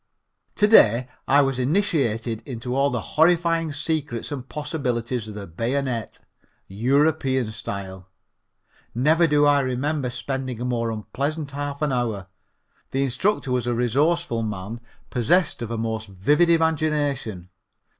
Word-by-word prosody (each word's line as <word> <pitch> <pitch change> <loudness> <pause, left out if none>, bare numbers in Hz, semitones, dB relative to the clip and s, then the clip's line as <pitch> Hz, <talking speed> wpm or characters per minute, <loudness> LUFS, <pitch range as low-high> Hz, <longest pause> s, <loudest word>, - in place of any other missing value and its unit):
To 210 - +4
day 125 - +6 0.2
I 140 +1 +5
was 135 -2 -1
initiated 125 - 0
into 125 -1 -4
all 140 +1 +3
the 125 -4 -2
horrifying 165 +1 +2
secrets 145 -4 -3
and 135 -3 -6
possibilities 125 -7 -3
of 105 - -8
the 100 -1 -6
bayonet, 120 - -3 0.5
European 130 +2 +1
style. 95 -3 -7 0.9
Never 160 +7 +4
do 145 -1 +4
I 145 -1 +5
remember 135 +1 -1
spending 130 -1 -4
a 125 - -3
more 120 -2 -1
unpleasant 140 +7 -3
half 145 +1 -4
an 150 - +1
hour. 115 -6 -1 0.6
The 135 +1 0
instructor 135 - 0
was 125 -1 0
a 120 - +1
resourceful 135 +3 +1
man 105 +1 -5 0.3
possessed 145 +5 +1
of 115 - -4
a 115 - -3
most 110 -1 -3
vivid 145 - +2
imagination. 150 - 0
130 Hz, 135 wpm, -24 LUFS, 115-150 Hz, 0.9 s, day